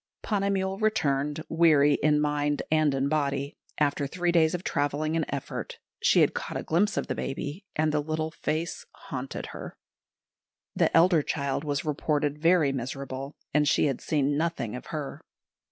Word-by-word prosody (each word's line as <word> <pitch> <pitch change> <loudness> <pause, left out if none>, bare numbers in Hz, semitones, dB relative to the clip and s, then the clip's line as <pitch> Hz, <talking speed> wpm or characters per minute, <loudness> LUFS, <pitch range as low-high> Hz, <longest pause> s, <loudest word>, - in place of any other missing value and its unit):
Ponnamal 195 -2 0
returned, 150 -8 +1
weary 155 -3 +5
in 150 0 +4
mind 150 -1 0
and 155 -3 +3
in 135 +1 +1
body, 140 -2 -1 0.2
after 145 -1 +1
three 175 +4 0
days 165 0 +3
of 180 - -5
travelling 150 +2 0
and 165 - +1
effort; 140 -2 -5 0.2
she - - +5
had - - +4
caught - - -4
a - - -4
glimpse 200 +6 +1
of - - 0
the - - -2
baby, 145 +7 -4
and 155 0 +2
the 150 0 +1
little 155 +1 -2
face 165 0 -3
haunted 130 0 -6
her. - - -8 1.0
The - - +3
elder 170 -1 +5
child 140 -1 -2
was 145 -1 -2
reported 150 0 0
very 165 -3 +4
miserable, 135 +2 -5 0.2
and 150 0 +3
she - - +3
had 135 -4 -1
seen 145 -2 +1
nothing 145 -9 -1
of 125 - -8
her. 150 -3 -5
150 Hz, 165 wpm, -27 LUFS, 140-165 Hz, 1.0 s, weary